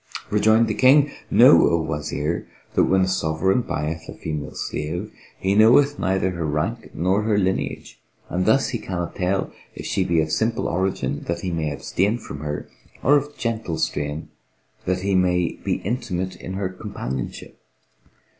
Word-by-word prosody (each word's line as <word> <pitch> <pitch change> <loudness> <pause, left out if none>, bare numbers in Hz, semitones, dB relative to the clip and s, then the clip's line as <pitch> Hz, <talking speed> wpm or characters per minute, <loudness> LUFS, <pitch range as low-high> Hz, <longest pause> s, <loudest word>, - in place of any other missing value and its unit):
Rejoined 110 +2 +4
the 110 - 0
King, 140 +5 +5 0.2
"Know, - - +7
O 85 - +3
Wazir, 75 +1 -2 0.3
that - - +4
when 95 0 +3
a 95 - +2
sovereign 95 +4 +1
buyeth 80 -4 -4
a - - -7
female 75 -2 -5
slave, 85 +8 -4 0.2
he 95 +1 0
knoweth 125 +7 +5
neither 95 0 +1
her 85 -2 -3
rank 80 +11 -3
nor 95 +5 +1
her 105 -1 +1
lineage 95 -1 -2 0.3
and 90 +2 -1
thus 110 +5 +4
he 120 - -3
cannot 85 -4 -4
tell 95 +1 -1 0.2
if - - -7
she 95 - 0
be 85 -2 +1
of 80 0 0
simple 115 +5 0
origin 85 -6 -1
that 85 0 -2
he 90 - -2
may 80 -2 -1
abstain 95 +9 0
from 70 - -8
her, 75 0 -4 0.4
or 145 - +6
of 145 0 -1
gentle 110 -9 -2
strain 75 -1 -2 0.6
that 90 0 0
he 100 +1 0
may 90 -2 +1
be - - 0
intimate 95 -4 -3
in 95 - -7
her 95 -1 -2
companionship. 90 - -6
95 Hz, 165 wpm, -23 LUFS, 80-110 Hz, 0.6 s, Know